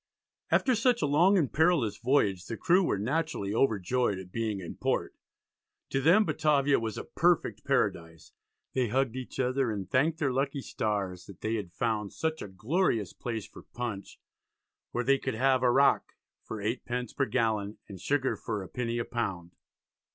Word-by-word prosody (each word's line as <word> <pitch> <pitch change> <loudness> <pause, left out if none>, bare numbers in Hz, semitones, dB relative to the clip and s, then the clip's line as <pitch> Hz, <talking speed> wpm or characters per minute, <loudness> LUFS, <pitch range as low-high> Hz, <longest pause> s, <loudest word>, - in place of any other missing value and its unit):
After 260 - +3
such 235 +1 +2
a - - +4
long 170 +8 +4
and 150 -8 0
perilous 160 - +2
voyage 105 -9 +1
the 115 - -4
crew 185 +1 +3
were 165 - +1
naturally 125 -3 -1
overjoyed 110 -2 +1
at 95 -1 -9
being 110 -2 -2
in 85 - -7
port. - - -1 0.8
To 135 - +1
them 175 +9 +5
Batavia 145 -5 +2
was 110 -2 -4
a - - -4
perfect - - +1
paradise. 80 -1 -1 0.4
They 130 -2 +1
hugged 130 +1 0
each 130 -1 -7
other, 130 0 +1
and 100 -4 -4
thanked 150 +5 +2
their 140 -6 0
lucky 135 +1 -1
stars 95 -7 -3
that 100 -2 -13
they 110 - -1
had 100 -6 -3
found 105 +1 -2
"such 160 0 -2
a - - -5
glorious 110 - 0
place 115 -4 -4
for - - -13
Punch, 115 -5 -6 0.7
where 120 - -2
they 135 +2 +3
could - - -3
have 130 +2 +3
Arrack 135 +2 +3 0.3
for 110 - -7
8d. 120 +2 -3
per 135 - +2
gallon, 110 -4 0
and 95 -3 -10
sugar 140 +3 +1
for 110 -3 -4
1 95 - -9
penny 120 -2 -2
a 120 - -1
pound." 95 -8 -3
120 Hz, 175 wpm, -29 LUFS, 105-140 Hz, 0.8 s, them